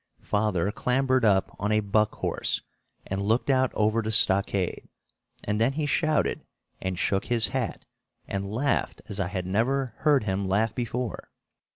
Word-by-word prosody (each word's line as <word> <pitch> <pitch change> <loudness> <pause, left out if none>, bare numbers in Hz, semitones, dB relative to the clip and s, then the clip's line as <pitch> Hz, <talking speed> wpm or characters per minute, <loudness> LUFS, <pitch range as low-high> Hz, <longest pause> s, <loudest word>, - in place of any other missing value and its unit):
Father 105 -3 0
clambered 130 +2 +1
up 100 -3 +2
on 105 +1 -1
a 110 - +4
"buck 105 +1 +1
horse" - - -1 0.4
and 95 +1 -3
looked 115 +7 +1
out 130 -1 +3
over 110 +2 +2
the 110 0 -2
stockade; 100 -3 +2 0.5
and 105 +1 -1
then 125 +4 +3
he 150 +1 -1
shouted 155 +1 +1 0.4
and 95 -1 -2
shook 95 +2 0
his 120 -3 +1
hat - - -3 0.4
and 100 0 -3
laughed 135 +6 -1
as 100 -1 -3
I 95 - 0
had 90 -1 -4
never 120 +6 0
heard 145 -5 +3
him 95 -1 -1
laugh 105 +4 +1
before. 120 0 -4
110 Hz, 160 wpm, -27 LUFS, 100-125 Hz, 0.5 s, a